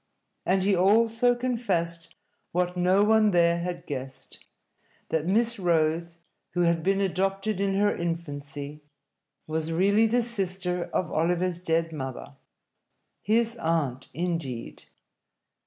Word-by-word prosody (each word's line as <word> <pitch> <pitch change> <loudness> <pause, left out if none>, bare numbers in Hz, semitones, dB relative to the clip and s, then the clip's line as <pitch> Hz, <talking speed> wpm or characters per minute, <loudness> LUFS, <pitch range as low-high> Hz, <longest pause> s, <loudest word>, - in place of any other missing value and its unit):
And 190 0 +3
he 200 0 +3
also 225 +6 +3
confessed 195 -10 -2 0.4
what 180 +1 0
no 180 +3 +3
one 220 0 +4
there 170 -2 +3
had 175 0 -4
guessed: 135 -2 -7 0.7
that 160 0 -1
Miss 230 +3 +1
Rose, 170 -1 +1 0.4
who 175 - +2
had 170 -1 +2
been 195 +3 +1
adopted 195 +1 -1
in 195 -1 +1
her 205 +1 +2
infancy, 145 -3 -5 0.6
was 160 +1 -2
really 200 +6 +3
the 240 +2 +2
sister 185 -5 -2
of 170 -3 -1
Oliver's 175 +2 0
dead 165 -2 0
mother 135 -1 -6 0.9
his 230 +2 +1
aunt, 150 - -1
indeed. 160 -7 -4
180 Hz, 120 wpm, -27 LUFS, 165-200 Hz, 0.9 s, one